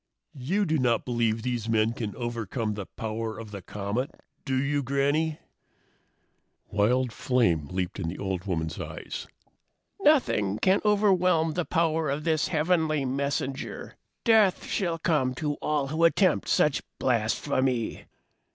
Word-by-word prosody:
"You 190 Hz, +11 st, 0 dB
do 160 Hz, -2 st, +1 dB
not 120 Hz, -3 st, +1 dB
believe 115 Hz, -2 st, 0 dB
these 120 Hz, -3 st, -2 dB
men 110 Hz, 0 st, +2 dB
can 110 Hz, -4 st, -5 dB
overcome 115 Hz, -2 st, -3 dB
the 100 Hz, -2 st, -6 dB
power 110 Hz, 0 st, -4 dB
of 110 Hz, -2 st, -8 dB
the 100 Hz, -2 st, -7 dB
comet, 105 Hz, +8 st, -3 dB, 0.4 s
do 135 Hz, -2 st, 0 dB
you, 145 Hz, +1 st, 0 dB
Granny?" 145 Hz, +4 st, +1 dB, 1.3 s
Wild 115 Hz, +4 st, +2 dB
flame 100 Hz, -, +1 dB
leaped 90 Hz, +3 st, -3 dB
in 85 Hz, -, -2 dB
the 85 Hz, -, -4 dB
old 95 Hz, -1 st, -3 dB
woman's 80 Hz, -4 st, -2 dB
eyes. -, -, -6 dB, 0.7 s
"Nothing 250 Hz, -, +3 dB
can 190 Hz, -, +3 dB
overwhelm 185 Hz, -6 st, +3 dB
the 175 Hz, 0 st, -1 dB
power 160 Hz, -2 st, +1 dB
of 145 Hz, +2 st, -2 dB
this 160 Hz, -1 st, +1 dB
heavenly 160 Hz, -3 st, +1 dB
messenger! 135 Hz, 0 st, -3 dB, 0.3 s
Death 220 Hz, -5 st, +4 dB
shall 170 Hz, -4 st, -1 dB
come 150 Hz, -6 st, +1 dB
to 150 Hz, +3 st, -1 dB
all 150 Hz, -2 st, 0 dB
who 160 Hz, +3 st, 0 dB
attempt 170 Hz, +1 st, +3 dB
such 150 Hz, -, +3 dB, 0.2 s
blasphemy!" 125 Hz, +1 st, 0 dB
130 Hz, 135 wpm, -27 LUFS, 110-160 Hz, 1.3 s, Death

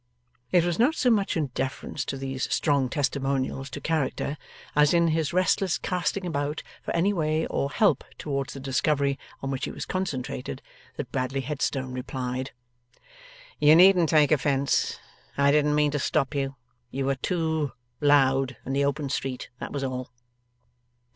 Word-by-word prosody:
It 175 Hz, -2 st, +4 dB
was 175 Hz, +1 st, -1 dB
not 275 Hz, +7 st, +4 dB
so 250 Hz, -, +3 dB
much 200 Hz, -5 st, +1 dB
in 145 Hz, -5 st, -1 dB
deference 135 Hz, +1 st, -3 dB
to 135 Hz, -, -4 dB
these 135 Hz, -1 st, -3 dB
strong 140 Hz, -4 st, +2 dB
testimonials 135 Hz, -1 st, -1 dB
to 135 Hz, -, -6 dB
character, 150 Hz, -2 st, -1 dB, 0.4 s
as 150 Hz, +3 st, +5 dB
in 170 Hz, -1 st, +4 dB
his 160 Hz, -2 st, 0 dB
restless 185 Hz, 0 st, +2 dB
casting 180 Hz, +1 st, -2 dB
about 150 Hz, -2 st, -2 dB, 0.2 s
for -, -, -8 dB
any 190 Hz, +5 st, +2 dB
way 155 Hz, -2 st, 0 dB
or 140 Hz, -, -1 dB
help 205 Hz, +8 st, +2 dB
towards 140 Hz, -2 st, -3 dB
the -, -, -6 dB
discovery 140 Hz, +1 st, +1 dB, 0.2 s
on 135 Hz, -, -2 dB
which 135 Hz, -, -2 dB
he -, -, -4 dB
was -, -, -6 dB
concentrated, 135 Hz, -7 st, -4 dB, 0.3 s
that 135 Hz, -4 st, -5 dB
Bradley 135 Hz, +1 st, -1 dB
Headstone 135 Hz, -1 st, -2 dB
replied: 130 Hz, 0 st, -4 dB, 1.1 s
'You 150 Hz, +1 st, +7 dB
needn't 180 Hz, -2 st, +6 dB
take 150 Hz, -2 st, +4 dB
offence. 140 Hz, -1 st, +1 dB, 0.4 s
I 140 Hz, 0 st, +4 dB
didn't 150 Hz, 0 st, +3 dB
mean 150 Hz, -1 st, +3 dB
to 145 Hz, -, -1 dB
stop 140 Hz, +1 st, 0 dB
you. 135 Hz, -1 st, -2 dB, 0.3 s
You 135 Hz, +1 st, -3 dB
were 135 Hz, -, +2 dB
too 160 Hz, 0 st, -1 dB, 0.3 s
loud 135 Hz, -3 st, +3 dB
in 135 Hz, -, -3 dB
the 140 Hz, +1 st, +2 dB
open 140 Hz, +1 st, -1 dB
street; 130 Hz, -1 st, -3 dB
that -, -, -6 dB
was 140 Hz, -1 st, -3 dB
all. 130 Hz, -1 st, -3 dB
140 Hz, 160 wpm, -26 LUFS, 135-160 Hz, 1.1 s, You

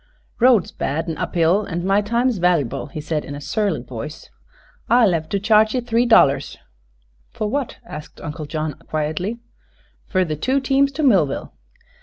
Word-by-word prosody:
"Road's 240 Hz, -6 st, +4 dB
bad 160 Hz, +5 st, -3 dB
an' 165 Hz, -, -3 dB
up -, -, -4 dB
hill, 175 Hz, +5 st, +2 dB
an' 175 Hz, 0 st, -3 dB
my 195 Hz, +2 st, +3 dB
time's 235 Hz, +1 st, 0 dB
vallyble," 170 Hz, -8 st, +1 dB
he 150 Hz, -, -7 dB
said 150 Hz, 0 st, -2 dB
in 140 Hz, -, -7 dB
a -, -, -6 dB
surly 160 Hz, -, -1 dB
voice. 130 Hz, +5 st, -8 dB, 0.6 s
"I'll 230 Hz, -6 st, +5 dB
hev 160 Hz, -1 st, -2 dB
to 200 Hz, -, 0 dB
charge 215 Hz, +2 st, +3 dB
ye 250 Hz, -, +1 dB
three 240 Hz, 0 st, +1 dB
dollars." 140 Hz, -11 st, +4 dB, 0.7 s
"For 215 Hz, -, -3 dB
what?" 275 Hz, +3 st, -3 dB
asked 150 Hz, 0 st, -9 dB
Uncle 150 Hz, 0 st, -6 dB
John, 155 Hz, 0 st, -3 dB, 0.2 s
quietly. 155 Hz, +8 st, -2 dB, 0.7 s
"Fer 185 Hz, -1 st, +1 dB
the 155 Hz, -2 st, -3 dB
two 260 Hz, -, 0 dB
teams 275 Hz, +1 st, +2 dB
to 305 Hz, +3 st, -2 dB
Millville." 185 Hz, -, +2 dB
180 Hz, 170 wpm, -21 LUFS, 155-230 Hz, 0.7 s, I'll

